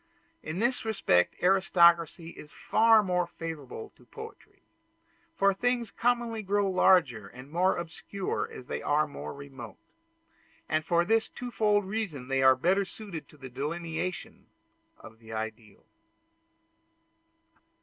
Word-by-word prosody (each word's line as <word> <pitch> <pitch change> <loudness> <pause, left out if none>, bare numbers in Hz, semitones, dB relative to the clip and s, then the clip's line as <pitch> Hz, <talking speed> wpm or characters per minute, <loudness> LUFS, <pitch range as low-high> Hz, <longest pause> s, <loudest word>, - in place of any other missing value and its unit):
In 155 - -5
this 240 +5 0
respect 195 - +2
aristocracy 170 -3 +4
is 150 - -12
far 225 -1 +4
more 180 -2 0
favorable 165 - -7
to - - -22
poetry; 445 0 -12 0.7
for 200 0 +3
things 240 +1 -1
commonly 235 -1 0
grow 205 0 +1
larger 175 - +3
and 130 +6 -13
more 180 +3 +2
obscure 170 +3 -4
as 125 - -10
they - - -4
are 150 +1 +2
more 140 - -7
remote; 135 -7 -10 0.9
and 155 0 0
for 170 +1 +2
this 225 +3 +2
twofold 215 -4 0
reason 190 - -4
they 135 0 +1
are 130 0 +7
better 185 +9 +2
suited 195 -4 -8
to 150 - -18
the 135 -2 -9
delineation 165 - -5 0.5
of 110 +1 -14
the 110 -1 -13
ideal. 110 -1 -7
175 Hz, 130 wpm, -29 LUFS, 140-210 Hz, 0.9 s, are